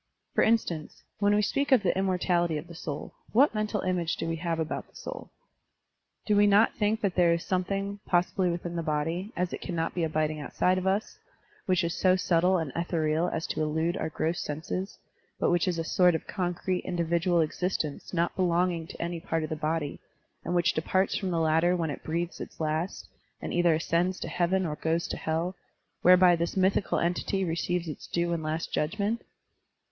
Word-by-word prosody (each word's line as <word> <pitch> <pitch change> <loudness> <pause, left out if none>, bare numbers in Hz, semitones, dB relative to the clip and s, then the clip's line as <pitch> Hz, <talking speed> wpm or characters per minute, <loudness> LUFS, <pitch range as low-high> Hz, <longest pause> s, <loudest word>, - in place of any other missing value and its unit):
*' - - -52
For - - +3
instance, 180 -9 0 0.2
when 205 0 +3
we 210 - +3
speak 280 +7 0
of 250 -6 +6
the 180 - +2
immortality 180 -3 +1
of 150 - -6
the 170 - -11
soul, 155 -3 -6 0.2
what 265 +5 +5
mental 215 -1 -1
image 180 -3 0
do - - -4
we 165 0 -1
have 165 0 -2
about 160 -1 -3
the - - -28
soul? - - -7 1.0
Do 210 - +2
we 205 0 +6
not 205 +2 +5
think 215 +1 0
that 200 -3 +1
there 175 -2 +4
is 170 - -2
some 185 -1 +1
thing, 200 +2 -3
possibly 180 +1 +2
within 175 0 -3
the 170 - -1
body, 165 +6 -2
as 180 0 -1
it - - -5
cannot 165 -2 -2
be 175 - -1
abiding 155 -1 0
outside 180 +5 +1
of 185 - -3
us, 195 +3 -1 0.5
which 185 -1 +3
is 170 0 -1
so 185 -1 +3
subtle 180 0 +3
and 160 -5 -2
ethereal 165 0 0
as 160 - -3
to - - -2
elude 160 +3 0
our 160 - -2
gross 165 +3 -1
senses, 165 +6 -4 0.4
but - - +2
which 175 +1 +2
is 175 -2 0
a 165 - -1
sort 180 +1 +4
of - - -3
concrete 180 0 -2
individual 170 0 +1
existence 160 -1 -2
not 170 -1 0
belonging 175 -2 +1
to - - -10
any 170 0 -3
part 165 -1 -2
of 155 - -5
the - - 0
body, 155 -1 -2 0.4
and 175 - -2
which 175 -2 +3
departs 185 +4 +1
from 190 - -2
the 170 -2 0
latter 165 +2 +3
when 165 -3 -1
it - - -7
breathes 170 +2 -3
its - - -9
last 160 +3 -2 0.3
and - - -5
either 175 -2 +4
ascends 170 +3 0
to - - -4
Heaven 185 +2 +1
or 150 -2 -3
goes 165 +1 0
into - - -4
Hell, 165 +4 -2 0.5
whereby 180 0 +7
this 170 +3 -2
mythical 190 0 +2
entity 180 +3 0
receives 170 +1 -1
its 155 - -7
due 170 0 0
and 165 - -2
last 155 +1 -3
judgment? 205 +8 0
175 Hz, 205 wpm, -28 LUFS, 165-185 Hz, 1.0 s, whereby